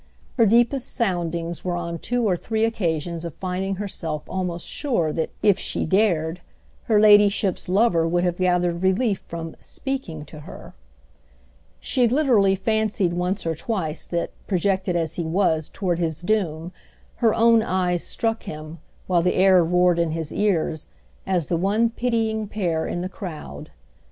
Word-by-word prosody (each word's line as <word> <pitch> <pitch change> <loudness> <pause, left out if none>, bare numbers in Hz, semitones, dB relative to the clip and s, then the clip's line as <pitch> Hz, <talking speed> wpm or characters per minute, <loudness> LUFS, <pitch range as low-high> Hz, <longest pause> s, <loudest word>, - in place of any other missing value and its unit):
Her 230 - +5
deepest 240 +4 +2
soundings 170 -6 -2
were 180 -1 -1
on 170 -1 -4
two 245 -2 0
or 185 - +2
three 220 +5 -1
occasions 170 -6 -2
of 170 -2 -6
finding 190 +2 -3
herself 165 -6 -4
almost 180 -2 -3
sure 175 - -1
that, 160 - -1
if 205 -3 +4
she - - -2
dared, 175 -3 +1 0.4
her 215 -2 +3
ladyship's 205 -3 +4
lover 185 -4 +3
would 175 +1 +1
have 175 -1 0
gathered 180 -1 +1
relief 190 +2 +1
from 165 -1 -7
"speaking" 205 - -5
to 150 +1 -11
her. 150 +5 -11 1.1
She 250 -3 +1
literally 230 -7 +3
fancied 215 -3 0
once 180 +2 -2
or 165 - 0
twice 160 -3 -3
that, 170 -1 -2 0.2
projected 190 -1 0
as 165 -1 -1
he 170 - -1
was 160 -2 +1
toward 180 -4 -2
his 165 -1 -2
doom, 175 -5 -1 0.5
her 225 -3 +3
own 230 0 +5
eyes 180 -4 0
struck 225 0 -1
him, 155 +1 -8 0.3
while 175 -2 +2
the 180 +1 +1
air 185 -1 +5
roared 180 +1 +3
in 165 -2 +1
his 160 -2 -4
ears, 170 -6 0 0.4
as 180 -4 +1
the 170 - -1
one 210 +6 +2
pitying 225 -3 -1
pair 175 -6 -1
in 175 - -3
the 180 - -2
crowd. 185 -5 -8
180 Hz, 155 wpm, -23 LUFS, 170-210 Hz, 1.1 s, Her